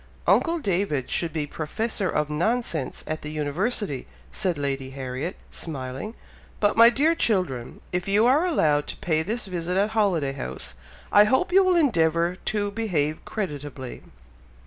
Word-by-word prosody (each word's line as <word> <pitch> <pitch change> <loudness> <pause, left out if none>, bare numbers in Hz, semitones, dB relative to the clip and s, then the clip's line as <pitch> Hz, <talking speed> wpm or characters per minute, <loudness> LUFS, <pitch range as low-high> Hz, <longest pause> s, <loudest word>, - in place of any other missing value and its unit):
"Uncle 335 0 +3
David 185 - -1
should 170 -2 0
be 155 -2 -2
Professor 190 +7 -2
of 150 0 0
Nonsense 170 - -1
at 155 0 -3
the 150 - -5
University," 155 - -1 0.2
said 185 -6 -1
Lady 135 -2 -2
Harriet, 130 +4 -4 0.2
smiling. 135 - -5 0.4
"But, 205 -1 +2
my 230 +1 +9
dear 295 +7 +3
children, 180 - -1
if 180 +1 -2
you 205 +3 +4
are 290 +8 +4
allowed 150 - +2
to - - -4
pay 160 -2 0
this 220 +8 -2
visit 180 -1 -2
at 205 +2 +2
Holiday 185 -11 +1
House, 65 - -5 0.4
I 205 +1 +7
hope 350 - +1
you 385 +1 +7
will 370 -1 +3
endeavour 170 - +2
to 205 -1 0
behave 170 -9 -1
creditably?" 145 - -5
175 Hz, 150 wpm, -25 LUFS, 145-220 Hz, 0.4 s, my